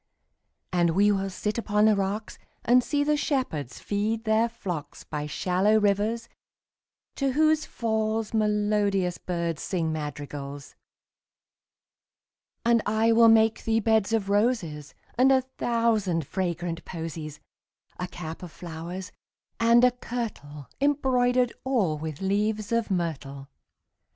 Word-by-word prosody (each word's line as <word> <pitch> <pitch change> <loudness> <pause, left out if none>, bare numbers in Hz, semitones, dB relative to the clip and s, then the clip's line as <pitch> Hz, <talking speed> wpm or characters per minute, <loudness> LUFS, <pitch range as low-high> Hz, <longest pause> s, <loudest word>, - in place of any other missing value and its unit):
And 170 -2 +2
we 205 +2 +5
will 195 -1 0
sit 210 +4 -3
upon 210 -2 +2
the 215 -1 +5
rocks, 200 +2 -3
5 - - -32 0.2
And 250 +1 +5
see 290 +2 0
the 300 +1 +2
shepherds 255 - -2
feed 215 +2 -1
their 220 +1 +2
flocks 180 -9 -6
By 150 0 -4
shallow 190 +7 +2
rivers, 210 +3 +1 0.9
to 275 -2 0
whose 310 +1 +3
falls 220 -1 -1
Melodious 210 -4 +1
birds 170 -3 -3
sing 165 -4 -1
madrigals. 145 -2 -6 1.9
And 235 -1 +4
I 220 +2 +3
will 230 0 +7
make 225 0 +4
thee 225 0 +2
beds 220 -1 +2
of 220 -3 0
roses 200 - 0 0.2
And 265 +2 +6
a 265 -1 +5 0.2
thousand 220 -9 +1
fragrant 175 -1 -3
posies; 160 -3 -6 0.6
10 180 - -1
A - - -7
cap 165 -2 -7
of 180 -3 -8
flowers, 175 +3 -7 0.5
and 235 +1 +5
a 250 - +6
kirtle 215 - -6
Embroider'd 255 -4 +2
all 205 - +1
with 155 0 -6
leaves 210 +2 0
of 230 -1 +1
myrtle. 140 -7 -3
205 Hz, 130 wpm, -26 LUFS, 170-230 Hz, 1.9 s, will